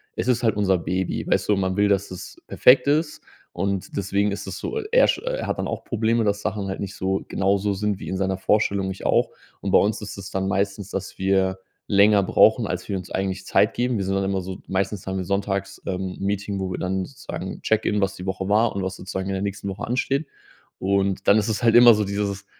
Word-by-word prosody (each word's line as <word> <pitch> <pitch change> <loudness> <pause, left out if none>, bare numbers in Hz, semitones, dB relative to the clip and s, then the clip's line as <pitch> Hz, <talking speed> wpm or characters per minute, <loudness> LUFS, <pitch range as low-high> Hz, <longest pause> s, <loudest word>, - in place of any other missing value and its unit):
Es - - -3
ist 125 -1 +2
halt 110 -3 +2
unser 95 -3 +2
Baby, 90 +2 -2
weißt - - +1
du, 105 - +5
man 95 -1 -1
will, 105 +1 +3
dass 100 -1 0
es 90 - -9
perfekt 125 0 +5
ist, 150 +2 +1 0.3
und 95 +1 -3
deswegen 100 +1 0
ist 100 +1 -5
es 95 - -5
so 450 - -3
er - - +6
sch - - +1
er - - -3
hat - - -2
dann - - -1
auch - - -4
Probleme, 115 0 0
dass 105 0 0
Sachen 100 -1 -3
halt 95 - -4
nicht 100 -1 -5
so 95 +1 -1
genauso 100 +1 +1
sind 105 0 -2
wie - - -8
in 95 - -2
seiner 95 -1 -1
Vorstellung, 100 -1 +1
ich 95 - -9
auch. - - +3 0.3
Und - - -3
bei - - +7
uns 105 +3 +1
ist 105 -1 -7
es 100 0 -8
dann 95 0 -1
meistens, 100 0 -1
dass 95 -1 -5
wir 95 0 +1 0.3
länger 100 0 +5
brauchen, - - +4
als - - -4
wir 100 - -1
uns 90 -1 -9
eigentlich 95 0 -2
Zeit 105 - +2
geben. 125 -1 0
Wir 95 - -2
sind 95 0 -1
dann 95 - 0
immer 95 0 -1
so 95 +1 -6
meistens 95 0 -2
haben 95 0 -3
wir 95 - -3
sonntags, 100 0 -2
ähm, 95 -1 -3
'n - - -3
Meeting, 100 0 -2
wo 95 -1 -3
wir - - -4
dann 95 0 -1
sozusagen 135 - -7
Check-in, 105 0 +1
was 95 0 0
die 90 - -8
Woche 95 0 -3
war 110 +2 +3
und 100 - -2
was 95 0 -3
sozusagen 95 +1 -5
in 95 - -1
der 95 - -2
nächsten 100 0 -4
Woche 95 - -5
ansteht. 135 +4 0 0.5
Und 95 0 0
dann 100 - +6
ist 110 +1 +1
es 110 - -1
halt 115 -1 +4
immer 120 -1 +9
so 105 -1 0
dieses: 100 0 -3
100 Hz, 245 wpm, -23 LUFS, 95-105 Hz, 0.5 s, immer